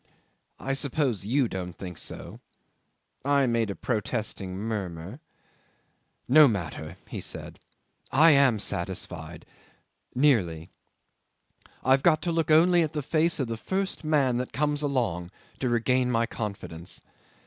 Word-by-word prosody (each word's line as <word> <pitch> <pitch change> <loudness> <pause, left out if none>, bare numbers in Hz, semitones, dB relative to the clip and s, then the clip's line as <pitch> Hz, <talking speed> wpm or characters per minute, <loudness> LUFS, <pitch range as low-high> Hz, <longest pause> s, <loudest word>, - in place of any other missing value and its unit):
I 135 - -2
suppose 135 -7 -1
you 130 +2 +2
don't 90 -4 -6
think 90 -4 -7
so.. - - -7 0.4
." - - -48
'I 140 0 +3
made 115 -3 +1
a 100 - -3
protesting 105 -4 -3
murmur. 100 - -4 1.1
'"No 150 +3 +8
matter," 85 - -4
he - - -6
said. - - -6 0.5
"I 160 +4 +7
am 140 -5 +5
satisfied... 85 -4 -4 0.7
nearly. 95 - +2 1.1
I've 135 +1 +4
got 155 0 +3
to 175 - 0
look 165 -1 0
only 170 +3 +6
at 160 -2 -1
the 150 -2 -2
face 155 +3 +1
of 135 - +1
the 115 -1 -4
first 190 - -3
man 140 -5 +2
that 125 0 -4
comes 150 +1 0
along, 115 - -1 0.3
to 130 - 0
regain 125 +2 +2
my 115 -1 +2
confidence. 100 -7 -6
125 Hz, 135 wpm, -27 LUFS, 95-145 Hz, 1.1 s, No